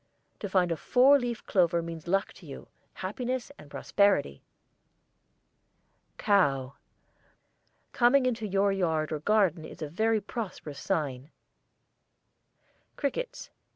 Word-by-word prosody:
To 205 - -5
find 180 -2 +2
a 165 - -1
four 270 - +5
leaf 240 -2 -4
clover 170 -3 +2
means 165 -1 -8
luck 195 +3 0
to 170 - -13
you, 135 - -10 0.2
happiness 245 +7 -4
and 145 - -13
prosperity. 190 - +1 1.8
COW. 135 -10 +2 1.2
Coming 255 +2 +4
in 255 - +2
your 200 -3 0
yard 160 -5 0
or 155 - -2
garden 190 -2 +2
a - - -9
very 220 +8 +1
prosperous 190 - -6
sign. 145 -7 -2 1.7
CRICKETS. 485 - -4
195 Hz, 110 wpm, -28 LUFS, 160-225 Hz, 1.8 s, four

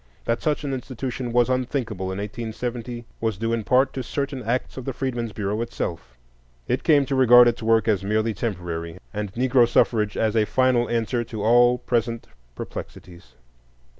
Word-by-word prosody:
That 115 0 0
such 150 -2 0
an 140 -2 -2
institution 125 -1 -4
was 120 0 +3
unthinkable 125 -6 -2
in 95 - -4
1870 120 +3 -5
was 110 -4 -1
due 115 +2 -1
in 115 -2 -1
part 130 +5 +3
to 130 - -3
certain 140 +1 -3
acts 120 +3 -2
of 130 - -6
the 135 - -3
Freedmen's 120 -3 -3
Bureau 105 +1 -2
itself. 80 - -5 0.5
It - - -1
came 145 -3 +4
to 140 - -3
regard 125 -2 +7
its 120 - 0
work 115 0 +2
as 100 -4 +2
merely 110 +2 0
temporary, 85 -6 -4 0.2
and 105 -2 -4
Negro 125 0 +4
suffrage 110 -3 +2
as 110 0 +1
a 110 -1 +3
final 125 0 +2
answer 120 +1 0
to 110 -2 -6
all 120 +2 +5
present 115 -1 -1 0.3
perplexities. 85 -1 -9
115 Hz, 170 wpm, -24 LUFS, 110-125 Hz, 0.5 s, regard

